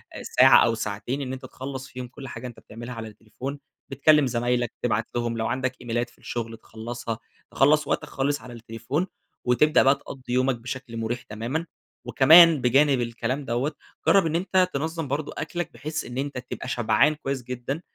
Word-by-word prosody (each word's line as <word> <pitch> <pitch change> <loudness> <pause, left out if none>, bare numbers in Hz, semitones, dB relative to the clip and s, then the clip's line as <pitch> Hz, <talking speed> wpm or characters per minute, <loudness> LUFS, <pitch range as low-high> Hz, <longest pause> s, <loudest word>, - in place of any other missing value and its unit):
آآ، - - -7
ساعة - - +6
أو 115 -1 +1
ساعتين 110 +5 -3
إن 130 -1 -4
أنت 130 - -7
تخلص 130 0 -7
فيهم 130 -1 -7
كل 135 +2 -10
حاجة 120 +1 -7
أنت 120 - -11
بتعملها 120 +3 -9
على 115 -1 -6
التليفون، 115 +6 -7 0.3
بتكلم 145 +1 +4
زمايلك، 120 0 0
تبعت 110 -2 0
لهم 120 -1 -1
لو 110 - -1
عندك 130 0 -2
إيميلات 120 0 -2
في - - -25
الشغل 115 -1 -5
تخلصها، 115 +1 -6 0.3
تخلّص 150 +3 +4
وقتك - - 0
خالص 140 +2 -1
على 125 - -10
التليفون 120 +9 -3 0.4
وتبدأ 150 +5 +4
بقى 135 +1 +5
تقضي 130 -2 -8
يومك 130 +1 +2
بشكل 120 0 -7
مريح 115 +2 -2
تمامًا، 120 +10 -4 0.4
وكمان 160 +2 +7
بجانب 135 +2 +4
الكلام 120 +4 -2
دوّة، 125 +5 -1 0.4
جرَّب 195 -3 +6
إن 160 0 -1
أنت 185 +1 +2
تنظم 160 +2 -2
برضه 145 +3 -3
أكلك 175 -1 -4
بحيث 150 +6 -4
إن 125 - -7
أنت 140 0 -3
تبقى 125 0 -6
شبعان 120 +4 +3
كويس 135 -3 -4
جدًا، 125 +5 -4
125 Hz, 175 wpm, -25 LUFS, 120-140 Hz, 0.4 s, وكمان